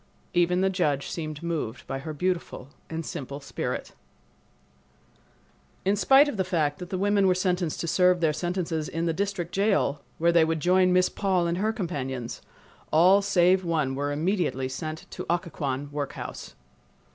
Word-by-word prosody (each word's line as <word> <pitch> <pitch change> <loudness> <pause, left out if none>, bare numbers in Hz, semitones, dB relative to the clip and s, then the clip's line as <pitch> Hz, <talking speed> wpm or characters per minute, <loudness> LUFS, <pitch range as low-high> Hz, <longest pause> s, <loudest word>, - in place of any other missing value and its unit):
Even 175 +1 +3
the 190 - +3
judge 150 -7 0
seemed 155 -2 -5
moved 160 -9 -3
by 135 - -4
her 155 +3 -6
beautiful 170 -4 -3 0.2
and 165 0 -4
simple 140 +1 -6
spirit. 140 -1 -4 1.9
In 195 +2 +3
spite 270 +9 +6
of 290 - -3
the 190 - +2
fact 155 -6 0
that 180 -1 -7
the 185 - -2
women 200 0 +3
were 185 - +4
sentenced 180 -3 -1
to 170 - -3
serve 180 +2 +4
their 160 -3 +2
sentences 170 -2 -2
in 165 +1 -2
the 165 - +1
District 190 -2 -2
Jail, 195 -8 +1 0.2
where 170 +1 +3
they 170 -1 +5
would 160 0 0
join 185 +2 +4
Miss 180 0 +4
Paul 190 -3 0
and 170 +1 -1
her 215 +2 +1
companions, 135 - -4 0.5
all 185 +5 +6
save 185 -1 +3
one 155 -6 0
were 145 +2 -2
immediately 155 -4 0
sent 155 +5 -5
to - - -6
Occoquan 145 -5 -2
workhouse. 145 -1 -6
170 Hz, 165 wpm, -26 LUFS, 150-185 Hz, 1.9 s, spite